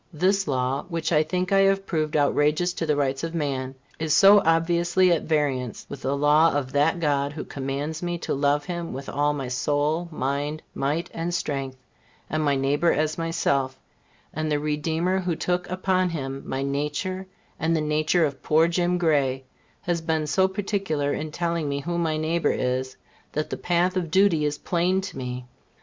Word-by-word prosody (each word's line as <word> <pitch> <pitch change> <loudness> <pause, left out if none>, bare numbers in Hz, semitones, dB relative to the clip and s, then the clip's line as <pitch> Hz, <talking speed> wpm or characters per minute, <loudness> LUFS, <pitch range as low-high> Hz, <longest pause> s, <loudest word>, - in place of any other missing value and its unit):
This 190 +4 +1
law, 130 0 -1
which 165 -1 -2
I 155 -2 +5
think 180 +4 -2
I 195 - +5
have 195 0 +3
proved 155 -4 -1
outrageous 150 +4 +2
to 165 - -3
the 150 - +2
rights 135 -1 -1
of 165 0 -3
man, 135 -4 -2 0.2
is 155 -1 +1
so 200 +1 +8
obviously 170 +2 +3
at 170 - +1
variance 140 -6 -1
with 140 - -7
the 140 +1 -1
law 150 +3 +5
of 135 -3 -1
that 150 +5 +2
God 145 -2 0
who 150 - -5
commands 140 +3 -4
me 175 -1 -2
to - - -3
love 145 +1 +1
Him 175 0 -4
with 135 +1 -7
all 145 +1 +1
my 140 -3 -4
soul, 145 +6 0
mind, 145 +2 -2
might 145 +5 -2
and 165 +1 -3
strength, 135 -6 -3 0.5
and 155 0 0
my 145 -2 +2
neighbor 140 +5 +2
as 155 +2 0
myself, 140 -5 0 0.5
and 155 0 -2
the 150 - +2
Redeemer 160 +5 0
who 180 -3 -1
took 180 +2 -1
upon 185 0 +1
him 135 -4 -4
my 135 +1 -2
nature 150 +7 -2 0.3
and 165 +1 +1
the - - +1
nature 155 +2 +2
of 140 -2 -4
poor 160 +2 +3
Jim 175 +1 +1
Gray 140 -6 +1 0.4
has 175 -3 -1
been 160 -1 0
so 190 +5 +3
particular 190 -7 -1
in 155 0 -4
telling 170 -2 -1
me 140 0 -2
who 170 +4 -2
my 160 -2 0
neighbor 160 +2 0
is, 130 +1 -2 0.4
that 155 +1 -2
the - - -1
path 175 +1 +1
of 175 -3 -1
duty 175 -3 +3
is 145 0 -1
plain 180 +3 +1
to 195 - -7
me. 125 0 -5
155 Hz, 185 wpm, -25 LUFS, 140-175 Hz, 0.5 s, so